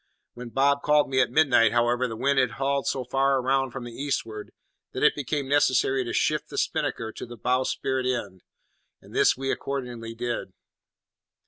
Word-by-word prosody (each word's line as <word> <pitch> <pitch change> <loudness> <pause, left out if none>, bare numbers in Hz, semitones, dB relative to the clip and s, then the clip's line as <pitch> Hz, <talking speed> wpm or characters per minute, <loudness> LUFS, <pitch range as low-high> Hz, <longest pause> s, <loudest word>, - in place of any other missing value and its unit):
When 125 0 -8
Bob 140 +3 +2
called 150 -2 +3
me 130 - +2
at 125 - +1
midnight, 125 -6 +4
however, 120 +1 +2
the 115 - -6
wind 140 +4 +1
had 130 0 +1
hauled 135 0 -1
so 130 - -1
far 135 +2 +2
round 135 0 +1
from 130 0 -6
the 120 -1 -8
eastward 115 -6 -4 0.4
that - - -3
it - - +6
became 145 0 -3
necessary 135 -2 +2
to 120 - -5
shift - - 0
the - - -8
spinnaker 110 -1 -1
to - - -8
the 120 0 -10
bowsprit 130 +2 -1
end; 100 -8 -3 0.6
and - - -17
this - - +3
we 135 0 -2
accordingly 120 -4 -5
did. 120 -5 -4
130 Hz, 180 wpm, -26 LUFS, 120-135 Hz, 0.6 s, it